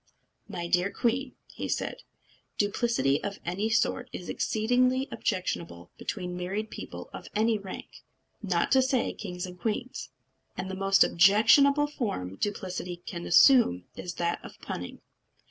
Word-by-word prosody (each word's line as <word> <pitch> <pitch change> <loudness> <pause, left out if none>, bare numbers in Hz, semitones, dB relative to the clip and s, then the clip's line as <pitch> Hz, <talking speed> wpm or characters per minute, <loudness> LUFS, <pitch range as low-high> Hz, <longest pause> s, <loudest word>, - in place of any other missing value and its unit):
"My 170 -1 -4
dear 180 +2 +2
queen," 255 +2 -1 0.3
said - - -2
he, - - -19 0.6
"duplicity 205 - +1
of 200 -1 -3
any 190 +6 -1
sort 250 +3 +1
is 175 - -7
exceedingly 250 +4 +1
objectionable 170 - -3
between 180 -3 -4
married 195 +5 -3
people - - -8
of - - -8
any 220 0 +2
rank, 195 -2 -9 0.4
not 180 -5 0
to 265 - +6
say 260 -1 +1
kings 180 -3 -5
and 180 -1 -10
queens; 235 +5 -3 0.5
and 190 +1 -4
the - - -4
most 195 +1 +4
objectionable 230 - +5
form 200 - -4
duplicity 185 -3 -3
can 170 -2 -6
assume 175 - +6
is 175 -1 -6
that 170 0 -1
of - - -11
punning." 90 - -6
200 Hz, 140 wpm, -28 LUFS, 180-235 Hz, 0.6 s, to